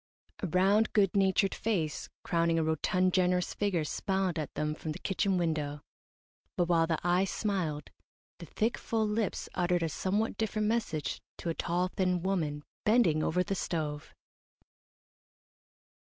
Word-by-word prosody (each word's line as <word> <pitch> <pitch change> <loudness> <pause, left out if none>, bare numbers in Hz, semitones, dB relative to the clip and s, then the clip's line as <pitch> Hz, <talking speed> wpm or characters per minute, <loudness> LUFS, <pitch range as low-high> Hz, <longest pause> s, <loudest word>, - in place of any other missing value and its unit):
A 190 - -1
round, 195 +6 +3
good 200 -3 +3
natured 195 0 +3
face, 170 -10 -2
crowning 170 -1 +1
a 165 - +2
rotund, 180 +4 +1
generous 180 -1 +2
figure, 195 -6 0
smiled 190 +2 -1
at 150 -4 -4
them 150 0 -1
from 155 0 -5
the - - -7
kitchen 195 0 +1
window, 150 -4 -1 0.8
but 175 - +3
while 165 -1 +3
the 165 -1 +1
eyes 180 +2 +2
smiled, 175 -10 -2 0.5
the 170 - -9
thick, 225 +2 -1
full 220 -2 0
lips 210 -1 -1
uttered 175 -1 +1
a 165 - 0
somewhat 205 +7 -1
different 215 -1 0
message 215 -9 -1 0.2
to 170 - -4
a - - +1
tall, 175 +2 0
thin 180 -2 0
woman, 155 -6 -1 0.2
bending 210 -9 +4
over 180 +3 +1
the 195 - -2
stove. 155 -5 -3
180 Hz, 150 wpm, -31 LUFS, 160-195 Hz, 0.8 s, bending